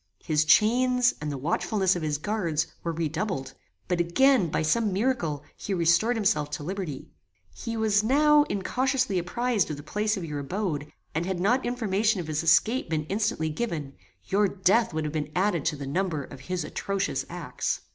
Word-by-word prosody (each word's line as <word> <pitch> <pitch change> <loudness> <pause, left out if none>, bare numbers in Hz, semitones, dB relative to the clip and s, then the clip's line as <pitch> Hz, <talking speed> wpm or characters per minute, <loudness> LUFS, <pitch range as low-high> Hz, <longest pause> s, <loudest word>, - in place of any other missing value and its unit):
His 155 -1 +2
chains, 245 - +4
and 150 0 -3
the 140 - -4
watchfulness 185 - +1
of 175 - -3
his 150 -2 -1
guards, 170 -3 -1 0.2
were 170 - -1
redoubled; 160 -3 -3 0.3
but 180 -1 0
again, 195 +3 +3
by 160 - 0
some 215 +7 +1
miracle, 185 - -1
he 200 - -3
restored 170 +8 +3
himself 150 -9 +1
to 150 - -5
liberty. 175 -5 -5 0.4
He 230 -1 -5
was 215 -2 +2
now 295 +5 +5
incautiously 255 -1 0
apprized 225 +3 0
of 150 - -4
the 145 - -9
place 210 +6 -1
of 180 - -4
your 150 -2 -4
abode: 150 -1 -3 0.2
and 165 +3 -1
had 190 -2 -2
not 240 +8 +2
information 220 -3 0
of 175 - -4
his 155 0 -1
escape 170 +8 +3
been 155 -2 -1
instantly 200 -6 0
given, 155 -5 -3 0.3
your 205 - +2
death 195 +4 +2
would 160 -1 -2
have 150 0 -3
been 150 -1 -3
added 185 -5 +1
to 160 - +1
the 140 -1 -6
number 155 0 -1
of 135 - -11
his 175 +5 -3
atrocious 195 +5 -2
acts. - - -3
185 Hz, 180 wpm, -27 LUFS, 155-220 Hz, 0.4 s, now